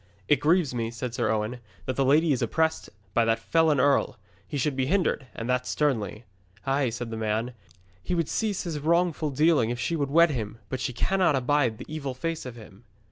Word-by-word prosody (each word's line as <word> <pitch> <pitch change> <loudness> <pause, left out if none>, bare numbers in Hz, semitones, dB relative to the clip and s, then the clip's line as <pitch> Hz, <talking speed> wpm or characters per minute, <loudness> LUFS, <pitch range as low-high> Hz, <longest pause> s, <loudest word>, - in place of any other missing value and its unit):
'It 145 - +5
grieves 155 -1 +2
me,' 115 -2 -2
said 115 +1 -5
Sir 120 -1 0
Owen, 110 +3 -1 0.3
'that 130 - -2
the 135 - +2
lady 150 +4 +4
is 130 - +1
oppressed 160 +7 0 0.2
by 120 - +3
that 115 0 +2
felon 155 +5 +2
earl. 140 +2 +2 0.3
He 145 - -4
should 140 +1 0
be 130 -1 0
hindered, 170 -6 +1
and 115 - -5
that 125 0 0
sternly.' 120 -7 -1 0.4
'Ay,' 135 -1 +1
said 120 0 -5
the 110 - -4
man, 110 +3 -1 0.5
'he 180 - -2
would 165 -3 0
cease 210 -4 -1
his 165 -5 -3
wrongful 165 0 +1
dealing 145 -4 +3
if 120 0 -3
she 165 +8 -1
would 140 -3 -1
wed 170 +3 +5
him, 110 -5 -4
but 130 - -3
she 130 - -2
cannot 185 +4 +2
abide 130 -3 +1
the - - -8
evil 140 -4 -4
face 165 +1 -3
of 125 - -8
him.' 105 -2 -14
135 Hz, 210 wpm, -27 LUFS, 120-155 Hz, 0.5 s, It